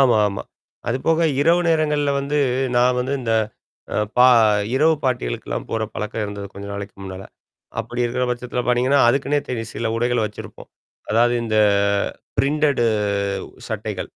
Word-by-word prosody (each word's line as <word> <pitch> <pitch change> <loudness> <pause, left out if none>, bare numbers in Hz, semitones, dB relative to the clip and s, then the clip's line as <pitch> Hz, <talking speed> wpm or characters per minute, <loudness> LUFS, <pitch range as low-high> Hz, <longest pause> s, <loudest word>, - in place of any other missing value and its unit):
ஆமா 125 -5 +5
ஆமா. 100 - -5 0.5
அதுபோக 160 +7 +1 0.2
இரவு 170 +4 +4
நேரங்கள்ல 150 -3 +2
வந்து 145 +2 -1 0.4
நான் 125 +1 +4
வந்து 130 +2 -2
இந்த 115 -2 -1 0.6
அ - - 0 0.2
பா 125 +1 +7 0.5
இரவு 160 +4 +4
பார்டிக்கல்லாம் 120 - -2
போற 115 -1 -1
பழக்கம் 105 +1 -3
இருந்தது. 100 -1 -6
கொஞ்ச 100 0 -8
நாளைக்கு 100 0 -6
முன்னால. 95 0 -7 0.6
அப்படி 120 +2 -3
இருக்கிற 125 +2 0
பட்சத்தில 125 0 -3
பார்த்தீங்கன்னா, 125 +3 +3
அதுக்குன்னே 140 +3 +1
தேடி 115 -3 -3
சில 115 -1 -2
உடைகள 120 +1 +1
வச்சிருப்போம். 105 - -10 0.4
அதாவது 120 +2 +3
இந்த 110 -1 -1 0.8
பிரிண்டட் 145 -3 +2 0.9
சட்டைகள். - - -4
125 Hz, 135 wpm, -21 LUFS, 115-140 Hz, 0.9 s, பா